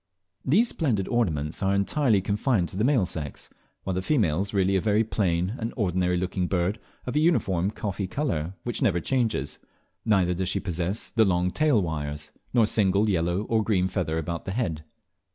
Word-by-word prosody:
These 210 - +3
splendid 115 - -1
ornaments 80 -10 -1
are 100 0 +2
entirely 105 +1 +2
confined 100 -1 0
to - - -9
the 105 - 0
male 125 -6 +3
sex, 75 -5 -6 0.3
while 95 - -2
the 90 - -1
female 95 - +1
is 100 +1 -2
really 95 -1 +2
a 95 - +2
very 110 0 +2
plain 90 -3 0
and 115 0 -3
ordinary 90 -4 +1
looking 90 0 -1
bird 90 +3 0 0.3
of 125 - -4
a - - +4
uniform 100 - +2
coffee 100 -3 -4
brown - - -16
colour 80 - -2
which 120 - -3
never 100 -10 +2
changes, 110 - -1 0.4
neither 95 -4 +2
does 90 +1 -1
she - - 0
possess 90 +2 -3
the 115 - +4
long 90 -2 +1
tail 150 -3 +3
wires, 75 -2 -4 0.2
nor 120 -2 +4
a - - +5
single 105 0 +2
yellow 85 +2 0
or 110 0 +1
green 95 -4 +1
feather 90 -4 -2
about 85 +1 -4
the 95 - -3
dead. 85 -10 -2
95 Hz, 190 wpm, -26 LUFS, 90-110 Hz, 0.4 s, a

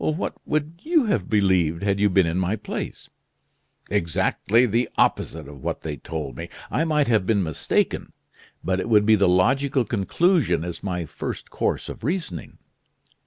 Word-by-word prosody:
"What 155 +4 -1
would 155 +2 -2
you 320 -5 +2
have 115 - 0
believed 95 -5 +2
had 100 -1 +1
you 105 0 +4
been 95 -1 +4
in 85 +2 -1
my 95 +3 0
place?" 105 -1 -6 0.8
"Exactly 105 +5 +2
the 120 +2 0
opposite 80 -3 +1
of 70 -2 -11
what - - -3
they 75 -2 -4
told 75 +1 -6
me. 85 +1 -6 0.2
I 165 - +1
might 150 -3 +2
have 110 -6 +2
been 100 -3 +2
mistaken; 80 -3 -1 0.5
but 95 +2 0
it 105 - -3
would 105 -2 +5
be 110 - +5
the 100 -3 +4
logical 130 +8 +2
conclusion 115 - +1
as 85 -2 -6
my 90 -3 -3
first - - -6
course - - -1
of - - -8
reasoning." 150 - -3
100 Hz, 165 wpm, -24 LUFS, 85-130 Hz, 0.8 s, would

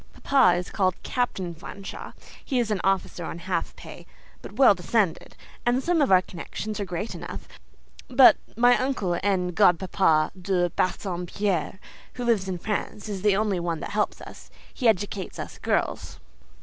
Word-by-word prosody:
Papa 255 -11 +4
is 180 - -5
called 185 -3 +1
Captain 195 -8 -2
Fanshawe; 195 +4 -9 0.3
he 265 - -2
is 235 -3 0
an 205 - 0
officer 195 -2 0
on 165 - -5
half 170 0 -3
pay, 170 +1 -12 0.3
but - - -10
well 255 -1 +6
descended, 195 -1 -1 0.3
and 245 +2 +1
some 345 -2 +2
of 275 - +2
our 185 -1 +6
connections 210 +5 -6
are 200 - -2
great 180 +4 -4
enough; - - -8 0.6
but 255 0 +7 0.2
my 245 +1 +5
uncle 210 -10 -1
and 185 -2 0
godpapa 180 -4 +3
De 180 -2 0
Bassompierre, 185 0 -2 0.3
who 245 - -5
lives 210 -5 +1
in 185 - -2
France, 210 +2 -4
is 195 -3 -4
the 205 -1 +3
only 205 -3 0
one 170 -2 -2
that - - -6
helps 210 0 -1
us: - - -12 0.2
he 250 - 0
educates 205 -2 0
us - - -7
girls. - - -2
195 Hz, 160 wpm, -25 LUFS, 180-220 Hz, 0.6 s, but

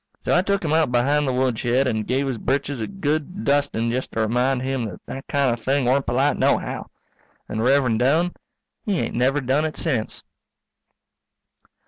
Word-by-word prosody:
So - - +2
I 175 - +5
tuk 200 -1 -1
him 155 - 0
out 160 -5 +3
behind 140 +4 +2
the - - +1
woodshed 125 0 +1
and 110 -4 -1
give 135 +2 0
his 125 -4 -3
britches 135 0 -1
a - - -2
good 170 0 -2
dusting 140 -5 +1
just 130 +2 -2
to 115 - 0
remind 125 +4 +1
him 130 -2 -1
that 100 -5 -7
that 135 - -7
kind 140 -4 +2
of 115 -1 -7
thing 135 +1 +1
weren't 130 +3 +2
polite 130 +5 +2
nohow. - - 0 0.6
And 110 - -3
Rev'rend 125 -3 +3
Doane, 160 +8 +2 0.5
he 205 -6 0
ain't - - -2
never 130 +4 +2
done 135 +4 +1
it 155 -1 -3
sence. 130 -10 -1
135 Hz, 180 wpm, -23 LUFS, 120-145 Hz, 0.6 s, I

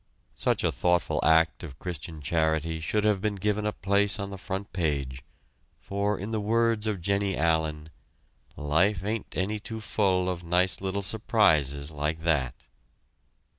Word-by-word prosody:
Such - - 0
a - - +2
thoughtful 90 0 +1
act 80 +1 +4
of 70 -6 -9
Christian 80 -3 -6
charity 80 +1 0
should 105 +7 0
have 105 -3 +2
been 105 -1 -1
given 105 +2 -1
a - - +1
place 100 -1 +2
on 100 -1 -4
the 100 - -6
front 95 +4 -5
page, 70 -7 -2 0.6
for 100 +1 -1
in 100 +4 -5
the 110 - 0
words 115 0 +1
of 100 -5 -2
Jennie 100 0 0
Allen: 80 -1 0 0.7
"Life 85 +7 +1
ain't 105 +1 -3
any 105 +3 -1
too 110 +1 -6
full 95 -4 +1
of 90 -2 -3
nice 90 +3 +2
little 100 +1 -2
surprises 80 - +2
like 75 +2 -2
that." 70 -6 +1
95 Hz, 155 wpm, -27 LUFS, 80-100 Hz, 0.7 s, act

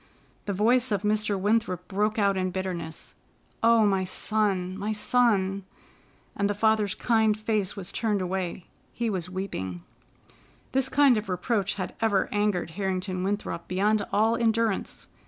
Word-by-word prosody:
The 200 - 0
voice 240 +5 +2
of 205 -1 0
Mr. 210 -1 +1
Winthrop 200 -3 0
broke 210 +2 0
out 200 -2 +3
in 185 -1 0
bitterness: 180 -3 -5 0.5
"Oh, 230 -1 +5
my 195 -2 +2
son, 190 -1 0
my 205 +2 -2
son!" 205 -4 +2 0.7
and 200 0 0
the 205 - -1
father's 215 -1 +2
kind 220 -3 +2
face 215 -3 -1
was 195 -1 -6
turned 215 -3 0
away. 185 -1 -3 0.3
He 235 -2 -1
was 180 -3 -3
weeping. 95 - -5 0.9
This 265 0 +1
kind 280 -4 +5
of 215 -1 -4
reproach 195 +2 -1
had 185 -3 -4
ever 210 -4 +2
angered 205 -5 0
Harrington 185 0 -2
Winthrop 195 -4 -3
beyond 205 +3 +1
all 220 +2 +3
endurance. 230 -3 0
205 Hz, 145 wpm, -27 LUFS, 185-220 Hz, 0.9 s, Oh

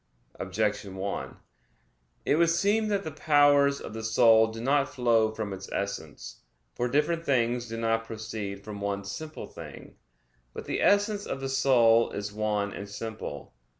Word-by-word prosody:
Objection 100 0 -2
1: 95 +1 -4 0.9
It 145 - +3
would 170 0 +4
seem 205 +6 +2
that 200 -2 0
the 160 - -5
powers 145 -2 +4
of - - -8
the 110 0 -6
soul 110 0 +5
do 110 0 -7
not 140 +3 +2
flow 115 -3 +2
from 110 -2 -4
its 95 0 -9
essence. 100 -7 -5 0.3
For 120 - -1
different 150 +6 +1
things 120 -4 +1
do 115 0 -5
not 115 0 0
proceed 110 -3 -6
from 105 -2 -7
one 100 0 -2
simple 155 +10 -6
thing. - - -11 0.6
But - - -6
the - - -2
essence 205 0 +2
of - - -3
the 135 0 -4
soul 120 -4 +4
is 100 0 -4
one 105 -1 -1
and 100 0 -7
simple. 105 -9 -7
115 Hz, 160 wpm, -28 LUFS, 105-140 Hz, 0.9 s, soul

